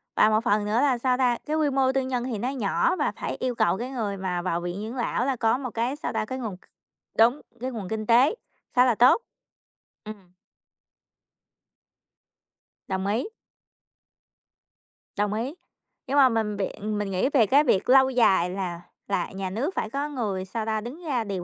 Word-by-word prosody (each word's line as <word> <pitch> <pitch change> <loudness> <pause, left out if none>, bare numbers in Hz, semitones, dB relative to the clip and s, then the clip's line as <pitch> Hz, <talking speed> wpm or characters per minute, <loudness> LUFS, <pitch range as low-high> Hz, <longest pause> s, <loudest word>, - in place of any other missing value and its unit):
và 215 - +5
một 215 0 +3
phần 210 -2 +1
nữa 210 - -3
là 275 -3 +3
sao 250 +1 +1
ta? 250 -2 +2
Cái 305 - -1
quy 310 -2 +2
mô 265 -1 +2
tư 270 0 +1
nhân 255 -2 -2
thì 245 -3 -3
nó 245 +5 -2
nhỏ 255 - 0
và - - 0
phải - - -4
yêu 255 -1 -1
cầu 175 -4 +2
cái 245 +4 -4
người 220 -7 -3
mà 180 -2 -2
vào 175 -1 -1
viện 175 0 -4
dưỡng 225 +3 -6
lão 245 0 -1
là 270 -1 0
có 225 0 +2
một 255 -3 -5
cái 235 +5 -1
sao 295 - -5
ta? - - -1
Cái 260 +4 -5
nguồn 220 -6 -4 0.6
đúng, 240 +6 +4 0.2
cái 255 +2 -3
nguồn 210 -6 -6
kinh 220 -1 -3
tế 245 - +4 0.4
khá 250 -2 +5
là 245 -3 +3
tốt. 250 - +5 0.8
Ừm. 200 -4 -11 2.5
Đồng 190 0 -2
ý. 220 +6 0 1.9
Đồng 205 0 0
ý, 240 +8 -3 0.5
nhưng 275 +2 0
mà 270 -2 +7
mình 220 -3 -1
viện 210 +2 -3
mình 205 -1 -2
nghĩ 190 +8 +1
về 260 -7 +4
cái 280 +8 +4
việc 195 -8 +1
lâu 265 0 +6
dài 200 -8 +3
là 180 -2 -4 0.3
là 190 -3 -1
nhà 190 0 -4
nước 260 - -3
phải - - -2
có 280 +5 -3
người, 205 -9 -3
sao 220 +3 -4
ta? 220 -1 -1
Đứng 285 +10 -9
ra 260 -7 0
điều 195 -4 -4
230 Hz, 195 wpm, -25 LUFS, 200-260 Hz, 2.5 s, mà